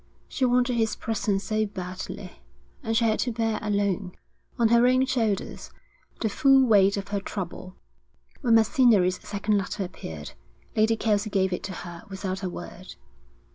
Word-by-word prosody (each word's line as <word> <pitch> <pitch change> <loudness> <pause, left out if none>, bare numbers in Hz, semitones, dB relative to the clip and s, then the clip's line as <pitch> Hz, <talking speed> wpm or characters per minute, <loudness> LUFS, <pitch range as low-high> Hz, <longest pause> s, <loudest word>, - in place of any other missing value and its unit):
She 265 - -1
wanted 245 0 +2
his 225 -1 +1
presence 205 -3 -1
so 215 -1 0
badly, 185 -2 -7 0.4
and 225 -4 0
she 230 - +3
had 220 -1 +1
to 245 - 0
bear 225 -1 -1
alone, 200 -3 -1 0.4
on 230 -2 +3
her 235 +1 +5
own 255 +1 +4
shoulders, 225 -6 -2 0.5
the 225 - +1
full 270 +5 +4
weight 200 -3 +4
of 200 0 -5
her 200 0 -1
trouble. 185 -1 -6 0.7
When 235 -5 +4
Macinnery's 220 -6 +4
second 205 0 0
letter 195 +1 -3
appeared, 80 - -8 0.4
Lady 220 +1 +3
Kelsey 215 -1 0
gave 190 -2 +1
it - - -3
to 190 - -5
her 170 -1 -8
without 190 -1 -4
a 185 - -2
word. 175 +1 -9
210 Hz, 160 wpm, -26 LUFS, 190-230 Hz, 0.7 s, her